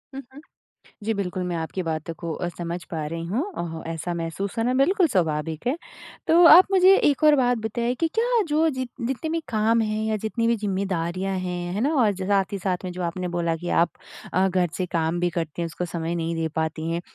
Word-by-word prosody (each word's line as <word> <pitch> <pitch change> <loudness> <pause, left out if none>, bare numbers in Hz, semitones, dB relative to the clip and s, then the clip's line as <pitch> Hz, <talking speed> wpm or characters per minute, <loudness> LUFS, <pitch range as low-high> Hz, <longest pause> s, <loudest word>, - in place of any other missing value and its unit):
हुँ, 270 - -5
हुँ। 290 - -11 0.6
जी, 225 - 0
बिल्कुल 185 -3 -3
मैं 175 -1 -2
आपकी 165 +3 -3
बातों 160 0 -3
को 170 -1 -5
अ, 175 - -3
समझ 170 0 -4
पा 155 -3 -3
रही 165 +1 -4
हूँ। 220 - -1
अ, 165 -1 -4
ऐसा 165 +2 -4
महसूस 170 +5 -4
करना 235 +2 +1
बिल्कुल 350 +8 +3
स्वाभाविक 160 - -1
है। 275 - +1 0.5
तो 340 +2 +6
आप 355 +4 +10
मुझे 380 0 +7
एक 290 +1 +2
और 300 -1 +7
बात 245 -2 +2
बताइए 235 +2 -2
कि 330 - +2
क्या 470 0 +2
जो 310 +2 +2
जितने 260 +2 -4
भी 330 - 0
काम 225 +1 +2
हैं 215 0 -1
या 220 - 0
जितनी 230 +2 -1
भी 235 - +3
ज़िम्मेदारियाँ 190 -2 -2
हैं, 180 -1 -3
है 205 - -1
ना? 295 +5 +1
और 210 - +3
साथ 195 +1 0
ही - - -1
साथ 185 -1 0
में 180 - -4
जो 180 - -6
आपने 180 +2 -2
बोला 170 -1 -1
कि 175 +2 -6
आप 170 - +3 0.4
अ, 190 +1 +3
घर 180 -1 +1
से 185 - -1
काम 165 0 -1
भी 175 0 +1
करती 165 0 -4
हैं - - 0
उसको 175 +2 -4
समय 170 0 -3
नहीं 165 0 -2
दे 165 0 -1
पाती 160 0 -2
हैं। 170 - -2
185 Hz, 225 wpm, -24 LUFS, 170-240 Hz, 0.6 s, आप